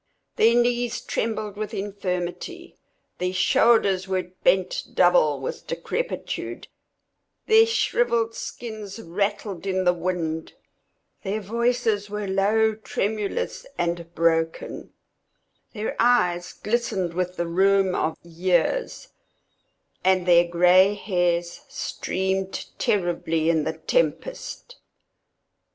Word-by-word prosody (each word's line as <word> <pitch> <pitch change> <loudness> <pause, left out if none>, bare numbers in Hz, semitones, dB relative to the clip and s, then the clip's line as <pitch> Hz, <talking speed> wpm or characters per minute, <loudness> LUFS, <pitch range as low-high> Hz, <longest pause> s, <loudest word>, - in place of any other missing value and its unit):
Their 230 +2 +4
knees 240 0 +1
trembled 215 -2 -3
with 215 0 -4
infirmity; 185 -3 -4 0.4
their 180 0 -1
shoulders 195 -2 +3
were 185 -2 -2
bent 185 +1 +2
double 175 -5 +4
with 130 - -6
decrepitude; 440 - -4 0.8
their 445 +1 +6
shrivelled 235 - +1
skins 220 -3 -7
rattled 200 0 -3
in 190 -1 0
the 180 -1 +4
wind; 170 -2 -3 0.7
their 205 +1 -2
voices 230 -1 0
were 210 0 -3
low, 210 +3 +2
tremulous 220 - -3
and 170 -1 -2
broken; 165 -1 0 0.8
their 215 -1 -3
eyes 180 -8 +2
glistened 210 -6 -1
with 180 +1 -2
the 170 - -1
rheum 190 +2 +3
of 160 - -1
years; 175 - 0 0.9
and 185 -1 +3
their 175 -1 +5
gray 180 +3 +5
hairs 175 -4 -1
streamed 190 0 -2
terribly 165 -4 +1
in 160 -2 +1
the - - -1
tempest. - - -2
190 Hz, 100 wpm, -24 LUFS, 175-220 Hz, 0.9 s, their